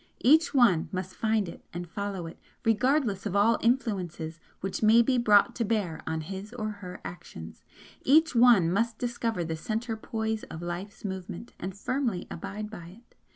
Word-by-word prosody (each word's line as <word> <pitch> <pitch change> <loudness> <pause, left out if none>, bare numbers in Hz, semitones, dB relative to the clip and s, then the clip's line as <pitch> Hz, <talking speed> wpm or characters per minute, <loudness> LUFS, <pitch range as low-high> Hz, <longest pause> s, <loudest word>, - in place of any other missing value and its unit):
Each 315 +5 +5
one 235 - +4
must 185 0 -4
find 220 -2 +1
it 170 - -10
and 175 +1 -5
follow 200 -1 -4
it, 165 - -9 0.3
regardless 225 -2 +2
of 185 - -3
all 220 +3 +4
'influences' 185 -10 -1 0.2
which 190 0 -4
may 225 +2 +6
be 255 +1 +2
brought 210 -4 +5
to 235 - +1
bear 205 -7 -1
on 160 0 -1
his 195 +6 -7
or 215 -3 -3
her 185 -3 -9
actions, 170 - -9 0.4
each 315 +4 +4
one 230 -8 +6
must 230 +3 0
discover 235 -5 -2
the 160 0 -3
Centre 225 +7 -3
poise 220 0 -3
of 160 - -8
Life's 185 +5 -6
movement, 190 +2 -6
and 185 +2 -5
firmly 240 -4 -1
abide 210 +5 -6
by 175 -6 -9 0.2
it. - - -33
205 Hz, 170 wpm, -28 LUFS, 180-230 Hz, 0.4 s, may